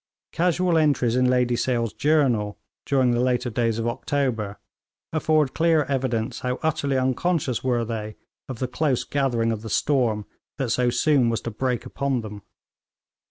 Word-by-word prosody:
Casual 175 0 +2
entries 140 -6 +2
in 125 0 +3
Lady 125 -1 +2
Sale's 120 -2 -1
journal, 130 -8 +1 0.3
during 130 -3 +3
the 120 - +1
later 125 -1 0
days 115 0 0
of 115 - -2
October, 120 -5 -2 0.6
afford 155 -3 +2
clear 165 -2 +3
evidence 130 -5 -2
how 125 0 -2
utterly 140 -3 0
unconscious 130 +1 0
were 120 -3 +1
they 110 -2 -5 0.3
of 130 - -5
the 130 - -2
close 135 0 0
gathering 120 -5 0
of 110 -2 -3
the 110 - -7
storm 115 -6 +1 0.3
that 135 -5 -1
so 125 0 +2
soon 135 -1 +3
was 115 - -1
to 115 - -5
break 125 +2 -2
upon 135 -1 -1
them. 105 -2 -8
125 Hz, 160 wpm, -24 LUFS, 115-140 Hz, 0.6 s, in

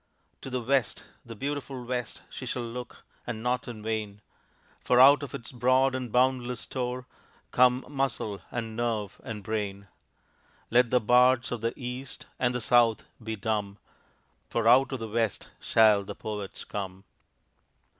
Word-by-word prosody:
To - - -7
the 125 -2 -2
West, 135 +1 0 0.2
the 115 -1 -9
beautiful 135 0 -4
West, 125 -2 -4
She 130 - -7
shall 120 0 -2
look, 120 +1 -8 0.2
and 115 -2 -4
not 125 0 0
in 110 -3 -7
vain 105 -2 -3 0.6
For 125 - +3
out 140 +3 +8
of 140 - -6
its 115 - -7
broad 130 +2 +3
and 130 -3 -4
boundless 125 -1 +1
store 125 -1 -4 0.5
Come 125 +1 +4
muscle, 135 -7 -2
and 115 -2 -4
nerve, 110 -4 -2
and 105 -3 -6
brain. 100 -2 -3 0.8
Let 120 0 +5
the 125 - +4
bards 125 +2 +4
of 120 -3 -3
the 115 +1 -1
East 125 +1 -6
and 125 -1 +1
the 125 - -1
South 115 0 +4 0.2
be 110 0 -3
dumb 105 -1 -2 0.7
For 115 -1 0
out 130 +4 +6
of 130 - -3
the 115 - -4
West 110 -1 -1
shall 110 -3 +4
the - - -7
Poets 105 -2 -6
come. 95 -2 -6
120 Hz, 155 wpm, -28 LUFS, 110-125 Hz, 0.8 s, out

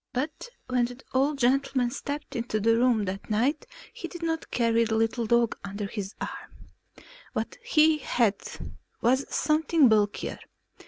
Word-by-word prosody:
But 295 - -3 0.2
when 250 -1 +1
the 245 +1 -8
old 280 +3 +2
gentleman 260 -1 +2
stepped 285 +2 -5
into 230 -2 -1
the 225 +2 +3
room 235 -3 +3
that 195 +3 -5
night 240 +8 +1 0.3
he - - -6
did 345 -2 -9
not 325 -1 -2
carry 230 -1 +2
the 225 -1 0
little 225 +1 0
dog 235 0 +3
under 200 +1 -4
his 200 -1 -5
arm; - - -8 0.6
what - - -3
he 315 -9 +4
had 230 -7 +1 0.6
was 260 +4 +3
something 310 -2 +3
bulkier. 210 -2 +1
240 Hz, 150 wpm, -27 LUFS, 220-280 Hz, 0.6 s, he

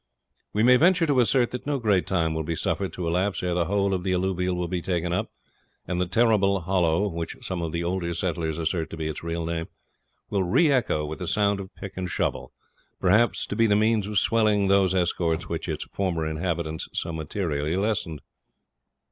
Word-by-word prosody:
We 105 - +1
may 125 +1 +7
venture 175 +3 +4
to 145 -4 +2
assert 125 0 +3
that 125 +2 -6
no 145 -1 +1
great 105 -7 +1
time 85 -4 +1
will 80 - -2
be 80 +1 -3
suffered 95 +3 -1
to 90 - -4
elapse 90 +4 0
ere 90 -1 0
the 85 -1 +1
whole 100 +2 +1
of 90 -2 -2
the 95 0 0
alluvial 90 0 0
will 90 0 -2
be 90 0 -2
taken 85 -1 -1
up, 90 - -1 0.6
and 90 0 -2
the 90 - 0
Terrible 100 -1 +3
Hollow, 90 +1 +1
which 85 -3 -5
some 90 -2 -3
of 85 -1 -3
the 85 +1 -2
older 85 0 -2
settlers 80 -3 -2
assert 80 0 -1
to 80 - -7
be 80 -1 -3
its 80 - -5
real 85 0 -3
name, 80 0 -3 0.6
will 100 - +1
re 120 - +3
echo 120 - +1
with 75 +1 -6
the 90 - -4
sound 100 0 +1
of 95 -1 -9
pick 100 -1 -9
and 90 -1 -3
shovel; - - -2 0.5
perhaps 105 +6 +3
to - - -5
be 115 +1 +3
the 105 - +3
means 110 -1 +2
of 105 -1 -2
swelling 105 -1 +3
those 95 -1 +3
escorts 85 -2 0
which - - -4
its - - -2
former 90 -5 -1
inhabitants 80 0 -3
so 85 - -2
materially 80 -1 -2
lessened. 95 -7 -1
90 Hz, 205 wpm, -25 LUFS, 85-100 Hz, 0.6 s, may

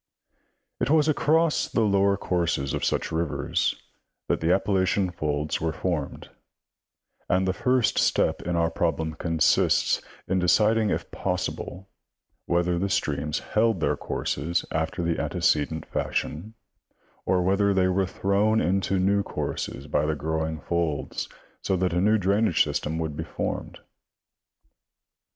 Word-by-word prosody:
It - - 0
was 155 0 +4
across 160 +1 +2
the 115 - +1
lower 100 -1 +3
courses 85 -8 -1
of - - -2
such - - 0
rivers 80 -2 0 0.5
that - - +1
the 80 +2 +2
Appalachian 95 0 +1
folds 75 -2 -2
were 80 0 0
formed, 85 -7 -3 1.0
and 95 +1 +2
the 95 - +1
first 125 +1 +2
step - - +2
in 85 0 -2
our 85 -1 +1
problem 80 -1 -1
consists 80 0 +2 0.3
in 95 +1 +1
deciding 105 +5 +3
if - - -3
possible 90 0 -4 0.6
whether 85 0 +1
the 100 +2 -1
streams 75 -3 -1 0.2
held 110 -3 +3
their - - +1
courses 85 +5 -2
after - - -2
the 85 0 0
antecedent 80 +1 0
fash - - -1
ion, 100 +9 -9 0.7
or 90 -1 +2
whether 100 +2 +2
they 95 -1 +3
were 95 +1 +1
thrown 100 +4 +1
into 95 +1 +1
new 100 +2 +2
courses 70 -7 -4
by 75 0 0
the 80 - 0
grow 80 +1 -2
ing 80 -2 -5
folds, 85 -3 -2 0.3
so 95 - 0
that 90 -1 0
a 90 - +1
new 105 +3 +4
drainage 100 -2 +3
systen 80 +2 -2
would 80 -2 -3
be - - -4
formed. - - -4
90 Hz, 140 wpm, -26 LUFS, 80-100 Hz, 1.0 s, was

